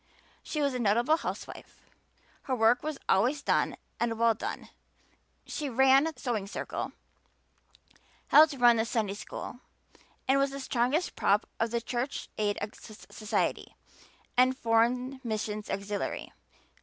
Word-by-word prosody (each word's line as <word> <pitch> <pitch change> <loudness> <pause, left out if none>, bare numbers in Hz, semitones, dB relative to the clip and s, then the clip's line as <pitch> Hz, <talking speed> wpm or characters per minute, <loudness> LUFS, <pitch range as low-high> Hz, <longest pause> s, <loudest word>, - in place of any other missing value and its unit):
She 305 -2 -2
was 280 -2 +1
a 250 - -2
notable 235 +7 +3
housewife; - - -7 0.7
her 260 - 0
work 235 +1 +4
was 305 -2 -4
always 255 +9 +2
done - - +1 0.2
and 230 -1 0
well 230 0 +4
done; 220 - -6 0.8
she 295 -2 -4
"ran" 265 +3 +5
the 320 - -2
Sewing 225 -7 -2
Circle, - - -4 1.4
helped 305 -1 +7
run 240 -2 +5
the 220 - +1
Sunday 220 -4 -1
school, 210 +3 -7 0.7
and 270 +1 +4
was 275 0 +2
the 275 +1 -7
strongest 260 +6 0
prop 205 +1 +2
of 225 - +1
the 235 +1 -1
Church 245 +3 -3
Aid 205 -1 +1 0.2
Society 215 0 -3 0.6
and 255 +1 +4
Foreign 250 +3 +1
Missions 215 -2 -3
Auxiliary. 200 +1 -3
240 Hz, 130 wpm, -29 LUFS, 220-270 Hz, 1.4 s, helped